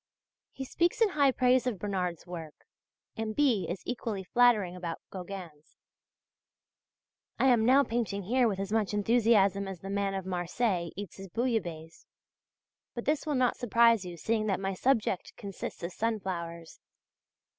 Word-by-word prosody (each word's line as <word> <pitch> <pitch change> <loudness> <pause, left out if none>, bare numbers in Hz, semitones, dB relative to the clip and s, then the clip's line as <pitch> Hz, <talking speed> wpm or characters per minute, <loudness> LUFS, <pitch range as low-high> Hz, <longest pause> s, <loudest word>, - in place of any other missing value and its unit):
He 265 - -6
speaks 345 - 0
in 450 -3 +5
high 285 -6 +3
praise 255 0 +3
of 235 -5 -1
Bernard's 180 -4 -3
work, 165 -4 -8 0.6
and 220 -1 -3
B. 255 -10 +2
is 175 +2 -4
equally 225 -5 -3
flattering 215 -4 +3
about 170 -2 -5
Gauguin's. 180 -5 -9 1.6
I - - +2
am 235 -2 +4
now 270 +2 +6
painting 225 -5 -2
here 245 +5 +2
with 195 -3 -2
as 195 +1 -3
much 215 -2 0
enthusiasm 205 -3 +3
as 190 -3 -7
the 195 - -6
man 200 -1 -1
of 190 -1 -4
Marseilles 180 0 -1
eats 200 -3 -7
his 195 0 -8
bouillabaisse, 175 -9 -3 0.9
and 240 - -5
this 300 +2 0
will 295 - 0
not 255 -2 +2
surprise 230 -2 +4
you 175 -1 -7
seeing 215 +5 0
that 195 -3 0
my 195 0 -2
subject 215 -3 0
consists 195 -3 -7
of 170 - -3
sunflowers. 175 -7 -4
200 Hz, 155 wpm, -30 LUFS, 180-240 Hz, 1.6 s, now